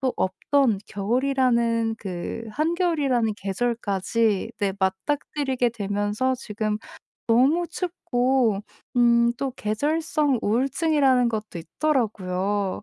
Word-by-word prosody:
또 260 Hz, -2 st, 0 dB
없던 225 Hz, +4 st, +1 dB
겨울이라는 235 Hz, 0 st, +1 dB
그 190 Hz, +3 st, -5 dB
한겨울이라는 300 Hz, -, +1 dB
계절까지 210 Hz, 0 st, -1 dB
네 200 Hz, -1 st, +1 dB
맞닥뜨리게 255 Hz, +6 st, -1 dB
되면서 205 Hz, +3 st, -1 dB
지금 215 Hz, -3 st, -3 dB, 0.5 s
너무 275 Hz, +10 st, +4 dB
춥고 260 Hz, -, 0 dB, 0.4 s
음 235 Hz, -1 st, +4 dB
또 270 Hz, +1 st, -3 dB
계절성 295 Hz, +4 st, 0 dB
우울증이라는 265 Hz, +2 st, +2 dB
것도 215 Hz, -4 st, -4 dB
있더라고요. 200 Hz, -, -1 dB
235 Hz, 245 characters per minute, -24 LUFS, 205-275 Hz, 0.5 s, 너무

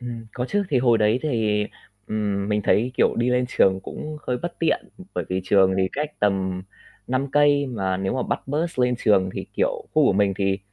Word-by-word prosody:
Ừm, 120 Hz, -2 st, -7 dB
có 125 Hz, -, -3 dB
chứ. 205 Hz, 0 st, +1 dB
Thì 140 Hz, -7 st, +2 dB
hồi 120 Hz, -2 st, +3 dB
đấy 110 Hz, +3 st, +3 dB
thì, 110 Hz, -8 st, 0 dB, 0.4 s
ừm, 100 Hz, -2 st, -2 dB
mình 105 Hz, 0 st, 0 dB
thấy, 120 Hz, +4 st, +2 dB
kiểu, -, -, +3 dB
đi 120 Hz, +1 st, +1 dB
lên 125 Hz, 0 st, +2 dB
trường 95 Hz, -5 st, +3 dB
cũng 155 Hz, +9 st, -7 dB
hơi 125 Hz, -, 0 dB
bất 175 Hz, 0 st, -5 dB
tiện, 165 Hz, -, 0 dB
ừm, 185 Hz, -, -12 dB
bởi -, -, -2 dB
vì 95 Hz, +1 st, -1 dB
trường 95 Hz, 0 st, +4 dB
thì 95 Hz, -1 st, +1 dB
cách 150 Hz, +1 st, -2 dB
tầm 95 Hz, -2 st, 0 dB, 0.4 s
5 130 Hz, +2 st, -1 dB
cây, 145 Hz, 0 st, +4 dB
mà 95 Hz, -7 st, -2 dB
nếu 95 Hz, 0 st, -2 dB
mà 130 Hz, -, 0 dB
bắt -, -, -2 dB
bus 155 Hz, +2 st, -2 dB
lên 125 Hz, 0 st, +3 dB
trường 95 Hz, -3 st, +4 dB
thì, -, -, -5 dB
kiểu, -, -, +2 dB, 0.3 s
khu 155 Hz, -1 st, +5 dB
của -, -, +4 dB
mình 100 Hz, 0 st, +2 dB
thì, 95 Hz, -1 st, 0 dB
115 Hz, 225 wpm, -23 LUFS, 100-135 Hz, 0.4 s, khu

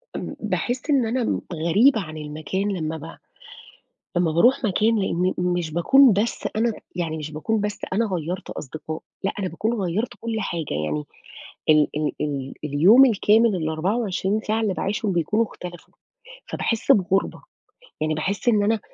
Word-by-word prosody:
إمم -, -, -5 dB
باحس 250 Hz, +4 st, -2 dB
إن 270 Hz, -5 st, +3 dB
أنا 240 Hz, +1 st, -1 dB
غريبة 200 Hz, -, +3 dB
عن 155 Hz, -3 st, -8 dB
المكان 155 Hz, +7 st, -3 dB
لما 160 Hz, -1 st, -3 dB
ب 160 Hz, +2 st, -10 dB, 1.0 s
لما 175 Hz, -2 st, +2 dB
باروح 245 Hz, -, +4 dB
مكان، 220 Hz, +2 st, +2 dB
لأن 185 Hz, -1 st, 0 dB
مش 175 Hz, -2 st, -1 dB
باكون 255 Hz, -, +6 dB
بس 210 Hz, +4 st, -1 dB
أنا 225 Hz, 0 st, +1 dB, 0.2 s
يعني 165 Hz, -3 st, -2 dB
مش 155 Hz, 0 st, -6 dB
باكون 210 Hz, +8 st, -1 dB
بس 210 Hz, 0 st, -3 dB
أنا 230 Hz, +3 st, +2 dB
غيّرت 180 Hz, -1 st, -4 dB
أصدقاء، 155 Hz, +2 st, -6 dB, 0.2 s
لأ، 195 Hz, -, +1 dB
أنا 190 Hz, -, -1 dB
باكون 215 Hz, +8 st, -2 dB
غيّرت 190 Hz, +7 st, -1 dB
كل 230 Hz, -1 st, -3 dB
حاجة، 165 Hz, -, -3 dB
يعني 75 Hz, 0 st, -2 dB, 0.7 s
ال-ال 150 Hz, 0 st, +3 dB
ال 140 Hz, -3 st, -3 dB
اليوم 175 Hz, -, +6 dB
الكامل 220 Hz, -2 st, +3 dB
ال24 190 Hz, +5 st, -1 dB
ساعة 220 Hz, +1 st, -1 dB
اللي 205 Hz, -4 st, 0 dB
باعيشهم 200 Hz, +1 st, -1 dB
بيكونوا 195 Hz, +7 st, +1 dB
اختلفوا، 175 Hz, -5 st, -10 dB, 0.5 s
فباحس 230 Hz, -2 st, 0 dB
بغربة، 195 Hz, 0 st, +1 dB, 0.6 s
يعني 155 Hz, 0 st, 0 dB
باحس 200 Hz, +10 st, -2 dB
إن 210 Hz, -3 st, +4 dB
أنا 220 Hz, 0 st, +1 dB
190 Hz, 150 wpm, -23 LUFS, 160-220 Hz, 1.0 s, باكون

